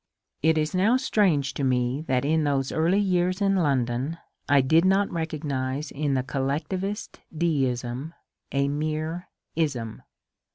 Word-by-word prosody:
It 160 +1 +3
is 155 +2 0
now 205 +7 +3
strange 180 - +2
to 140 - -3
me 125 +1 +1
that 130 0 +1
in 160 +1 +2
those 140 -2 0
early 165 +5 +2
years 185 -1 +1
in 195 -1 +2
London 135 -2 0 0.3
I 140 -1 +6
did 160 +6 +4
not 195 +2 +3
recognize 150 -4 -3
in 145 -1 -1
the 130 - +1
collectivist 155 - -3
deism 135 -3 -1 0.4
a 140 0 +1
mere 155 +4 -2
^^ - - -56 0.2
ism." 130 -9 -2
150 Hz, 140 wpm, -26 LUFS, 135-170 Hz, 0.4 s, I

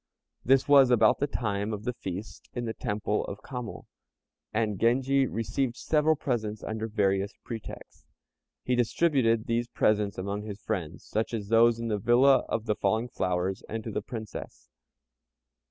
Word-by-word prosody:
This 135 +1 +4
was 140 -3 +7
about 115 -3 +4
the 145 - +1
time 105 -5 -2
of 105 -1 -4
the 125 +2 -2
feast 95 -1 -7
in 120 -1 -2
the 110 - -3
Temple 105 0 -1
of 100 - -8
Kamo, 125 -4 -6 0.7
and 105 -3 -1
Genji 135 +3 +3
received 115 +3 -2
several 155 0 +2
presents 110 -7 -3
under 110 0 -3
various 100 -2 0
pretexts. 115 -3 -9 0.6
He 125 - +1
distributed 120 -2 +2
these 115 +1 0
presents 105 -3 +1
among 100 +2 -3
his 105 -1 -7
friends, 90 -10 -4
such 110 +2 -2
as 100 -3 -5
those 115 0 +5
in 115 - -3
the 105 -1 0
villa 125 +4 +5
of 115 - -2
"the 110 - +1
falling 110 +4 0
flowers," 95 -1 -1
and 110 0 -4
to 110 - -5
the - - -2
Princess. 110 - -8
110 Hz, 160 wpm, -28 LUFS, 105-120 Hz, 0.7 s, was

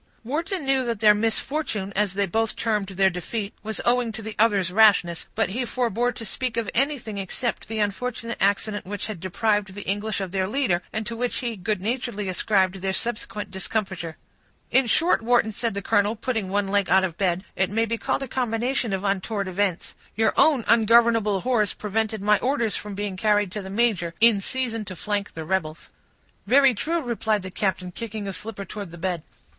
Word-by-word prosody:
Wharton 325 - -2
knew 270 -1 +2
that 230 -3 -2
their 210 -1 +7
misfortune, 220 -1 -1
as 200 -2 +1
they 200 0 +2
both 225 +4 -1
termed 210 -3 0
their 190 0 +2
defeat, 200 +4 -4
was 220 0 -4
owing 240 -1 +3
to 220 - -7
the 220 0 -6
other's 200 -5 +3
rashness; 195 -5 +4
but 220 -4 +1
he 240 +6 -2
forbore 245 0 0
to 225 - -7
speak 245 +4 -3
of 225 -3 -1
anything 255 -6 0
except 215 +6 -3
the 225 +1 -4
unfortunate 230 +3 -2
accident 205 0 +1
which 205 +1 -4
had 215 -5 -5
deprived 205 +2 0
the 205 - -7
English 205 +2 -1
of 190 -2 -4
their 190 -1 0
leader, 210 -7 +1
and 220 0 -3
to 230 +1 -4
which 245 +1 -1
he 240 -3 -2
good 200 0 -2
naturedly 225 -2 -2
ascribed 190 0 +1
their 190 0 -1
subsequent 210 -2 -3
discomfiture. 190 -4 -3 0.5
"In 260 -1 +4
short, 330 +6 +3
Wharton," 235 -1 +3
said 225 0 -2
the 200 - -3
colonel, 205 +1 +2
putting 220 -3 -2
one 200 0 0
leg 200 -2 +1
out 190 +2 +5
of 175 -4 -2
bed, 185 -1 0
"it 190 0 +1
may 225 +3 +1
be 230 0 -2
called 275 0 -1
a - - -5
combination 240 -1 -1
of 190 0 -2
untoward 200 +1 -1
events; 185 -1 -1 0.2
your 220 +1 +2
own 285 -7 +4
ungovernable 225 -3 +4
horse 235 -5 +1
prevented 215 0 -2
my 210 0 +4
orders 245 -4 0
from 210 -1 -5
being 200 -2 -3
carried 205 -1 +2
to 210 - -4
the 190 - -8
major, 195 -6 +1
in 225 -3 +6
season 230 0 -2
to 185 - -7
flank 205 +2 -3
the 160 -1 -5
rebels." 160 -3 -2 0.6
"Very 270 +3 +6
true," 325 +9 -1
replied 220 -4 0
the 185 - -7
captain, 185 -2 -1
kicking 215 +1 -5
a 195 - -3
slipper 205 -1 -5
towards 200 0 -7
the 170 - -11
bed. 175 -1 -2
210 Hz, 195 wpm, -24 LUFS, 195-230 Hz, 0.6 s, their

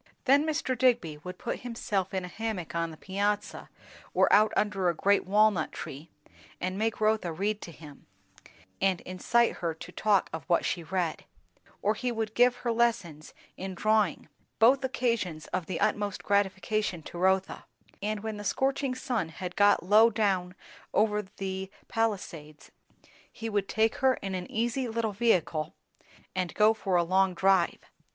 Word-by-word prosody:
Then 285 +3 +4
Mr. 290 -4 -1
Digby 235 -12 +1
would 180 +3 -8
put 235 - -4
himself 210 -6 -2
in 190 -1 -2
a - - -6
hammock 205 -3 -4
on 170 0 -1
the 160 - -11
piazza 205 +3 -2 0.5
or - - +4
out 215 +1 +6
under 195 -3 +1
a 170 - -1
great 200 +4 +2
walnut 205 -4 +3
tree, 145 +5 -8 0.5
and 185 +1 -2
make 220 +2 -1
Rotha 215 -5 +1
read 205 +5 -2
to 170 - -8
him, 150 -3 -14 0.7
and 190 -2 +2
incite 235 +6 +1
her 170 -3 -2
to 165 - -10
talk 205 0 +2
of 160 -2 -5
what 170 -2 +2
she 175 - -1
read; 170 -1 -2 0.6
or 210 - +3
he 250 +3 -2
would 220 -2 -3
give 245 +1 +4
her 240 - -2
lessons 225 -10 -1 0.2
in 190 0 -5
drawing; 215 -4 +1 0.3
both 260 +5 +5
occasions 230 -11 -1
of 180 -2 -2
the 185 - -3
utmost 205 -1 0
gratification 200 -2 0
to 175 - -8
Rotha; 190 +1 +1 0.4
and 210 0 -2
when 220 -1 -4
the 205 - -7
scorching 270 +4 0
sun 240 -9 -2
had 180 +2 -7
got 205 -2 +4
low 215 +5 +6
down 195 -5 0 0.4
over 210 0 +3
the 190 -1 -6 0.2
Palisades, 175 -9 -3 0.6
he 225 -1 -6
would 205 -2 -1
take 220 +1 +1
her 260 -1 +3
in 195 -1 -5
an 180 -1 -4
easy 240 +3 -1
little 225 -2 -2
vehicle 170 -8 +1 0.6
and 185 -2 -2
go 215 +1 +5
for 195 -4 -2
a 175 - +4
long 185 +1 +2
drive. 190 -2 +3
200 Hz, 165 wpm, -29 LUFS, 180-225 Hz, 0.7 s, out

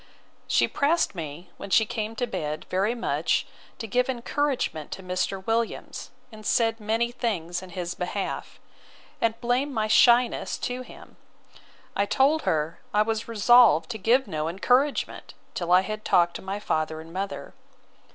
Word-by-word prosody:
She - - +3
pressed 315 +4 +1
me, 165 -1 -7
when - - -8
she 220 +3 +4
came 215 +1 -4
to 245 - -1
bed, 155 -9 -4
very 195 +6 +1
much, 235 - 0 0.3
to 225 - -5
give 250 +4 +1
encouragement 255 - -1
to 190 - -8
Mr. 185 +1 -2
Williams, 225 0 -2 0.2
and 215 -1 -12
said 225 +1 +1
many 225 +3 0
things 180 -9 -2
in 185 - -11
his 175 -1 -4
behalf; 190 +2 -4 0.6
and 230 0 +1
blamed 250 +4 0
my 220 -3 0
shyness 240 +2 +4
to 250 +1 -4
him. 255 - -13 0.8
I 200 - +1
told 270 +9 +3
her, 155 +1 -1
I 210 -2 +3
was 220 0 -2
resolved 225 -7 +5
to 220 - -5
give 245 +7 +3
no 155 -4 -2
encouragement, 250 - 0 0.2
till 175 -1 -3
I 180 +1 +7
had 215 +2 -5
talked 170 -1 +3
to - - -12
my 195 +2 -4
father 155 -5 -1
and 165 +1 -11
mother. 195 +1 -5
215 Hz, 160 wpm, -26 LUFS, 180-240 Hz, 0.8 s, I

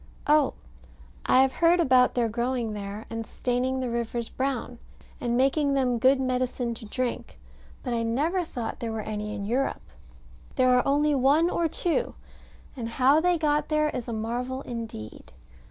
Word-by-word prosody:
Oh, 300 -1 +3 0.7
I 260 - +6
have 265 - +1
heard 340 +4 +3
about 255 -6 +4
their 240 -2 +2
growing 235 0 -2
there, 205 +1 -6
and 225 0 -3
staining 255 +1 -1
the 255 - -2
rivers 235 0 -3
brown, 260 -2 -3 0.4
and 240 -1 0
making 275 +2 +2
them 250 -3 +1
good 260 +3 +4
medicine 250 -2 -1
to 230 0 -10
drink: 245 - -4 0.5
but 245 - -2
I 230 - 0
never 295 +11 0
thought 240 -8 -5
there 230 -1 -3
were 220 0 -3
any 210 0 -4
in 200 -2 -4
Europe. 250 +6 -1 0.7
There 255 -1 +4
are 250 - +2
only 295 +2 +3
one 285 +6 +3
or 340 - +1
two, 350 +8 -1 0.6
and 235 -4 -4
how 265 +5 +4
they 355 0 +2
got 300 -1 +1
there 305 -1 +2
is 245 -1 -5
a - - -4
marvel 245 +4 -3
indeed. 225 - -8
255 Hz, 170 wpm, -26 LUFS, 230-275 Hz, 0.7 s, I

